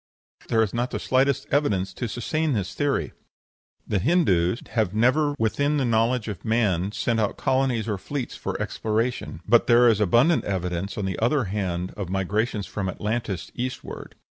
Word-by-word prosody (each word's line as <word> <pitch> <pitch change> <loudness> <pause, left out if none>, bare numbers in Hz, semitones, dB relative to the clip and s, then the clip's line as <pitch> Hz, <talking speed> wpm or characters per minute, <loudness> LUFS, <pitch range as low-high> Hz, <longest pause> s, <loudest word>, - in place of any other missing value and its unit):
There 110 -1 +3
is 105 - -3
not 120 +1 -1
the - - -3
slightest 135 +1 +1
evidence 95 -10 +1
to 120 - -4
sustain 150 +7 -1
this 95 -4 -2
theory. 145 -1 -1 0.7
The 100 - +1
Hindoos 105 - +2
have 105 -5 0
never 145 +6 +3
within 145 +6 +1
the 135 - +1
knowledge 115 0 +1
of 100 -5 -6
man 105 -5 +1
sent 115 +1 0
out 105 -2 0
colonies 130 -4 +1
or 105 -3 -2
fleets 135 +4 -4
for - - -4
exploration; 110 -5 -2
but 120 +2 +4
there 120 0 +6
is 110 -3 +4
abundant 120 - +4
evidence, 90 -1 -3
on 105 - -2
the 95 -2 -3
other 125 +4 +2
hand, 95 -3 -3
of 100 -4 -5
migrations 100 +3 -1
from 95 -3 -3
Atlantis 105 -2 -3
eastward. 125 +1 -6
110 Hz, 165 wpm, -25 LUFS, 95-125 Hz, 0.7 s, there